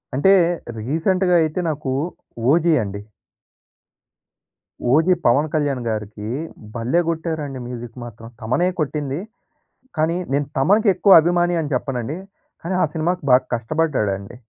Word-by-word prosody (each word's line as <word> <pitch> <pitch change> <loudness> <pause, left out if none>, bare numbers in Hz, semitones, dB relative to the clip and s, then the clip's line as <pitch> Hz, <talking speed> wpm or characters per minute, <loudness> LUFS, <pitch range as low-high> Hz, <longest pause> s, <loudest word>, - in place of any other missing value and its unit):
అంటే, 190 +9 +5 0.5
రీసెంట్‍గా 175 - +1
అయితే 155 +3 -2
నాకు, 150 -3 -3 0.6
'ఓజీ' 165 +2 +4
అండి. 100 0 -6 1.9
'ఓజీ' 160 +6 +4
'పవన్ 140 +6 +3
కళ్యాణ్‌‌‌‌‌‌‌' 140 -6 -1
గారికీ 105 -1 -4 0.5
భల్లే 120 +8 +1
గొట్టారండి 160 -5 -3
మ్యూజిక్ 120 -1 -8
మాత్రం. 115 0 -11
థమనే 130 +11 +1
కొట్టింది, 150 -1 -2 0.8
కానీ 160 +2 +1 0.2
నేను 145 0 +1
'థమన్‌'కి 200 +10 +4
ఎక్కువ 190 -1 +7
అభిమాని 175 +1 +1
అని 150 -1 -5
చెప్పనండి, 130 +4 -3 0.4
కానీ 180 +2 -2
ఆ - - +4
సినిమా‌కి 170 +1 -1
బాగా 125 +1 +6
కష్టబడ్డాడండి. 115 -6 -1
150 Hz, 115 wpm, -21 LUFS, 120-170 Hz, 1.9 s, ఎక్కువ